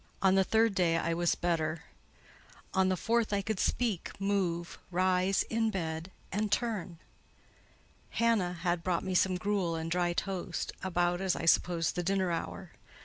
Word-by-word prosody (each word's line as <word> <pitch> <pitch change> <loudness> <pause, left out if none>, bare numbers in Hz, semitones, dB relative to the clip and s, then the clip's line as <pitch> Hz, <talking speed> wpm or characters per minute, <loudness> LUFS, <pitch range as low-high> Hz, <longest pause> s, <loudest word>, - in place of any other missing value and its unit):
On 190 -1 +5
the 195 0 +5
third 220 +2 +3
day 175 -3 +2
I 165 0 0
was 170 0 +1
better; 165 -2 -1 0.9
on 190 0 +3
the 185 - +1
fourth, 230 +3 +1
I 200 -1 0
could 220 -2 -2
speak, 225 -8 0
move, 185 -4 -1
rise 185 +1 +2
in 225 0 0
bed, 165 -3 -3 0.2
and 210 +1 -1
turn. 210 -7 -1 1.1
Hannah 225 -6 +1
had 175 0 -1
brought 180 -2 0
me 190 - -2
some 185 0 +3
gruel 190 -3 0
and 165 0 -4
dry 175 0 +1
toast, 190 0 -3
about, 175 -1 0
as 190 -2 +1
I - - -4
supposed, 170 -1 +3
the 175 - 0
dinner 190 0 +1
hour. 165 - -4
185 Hz, 160 wpm, -31 LUFS, 170-195 Hz, 1.1 s, On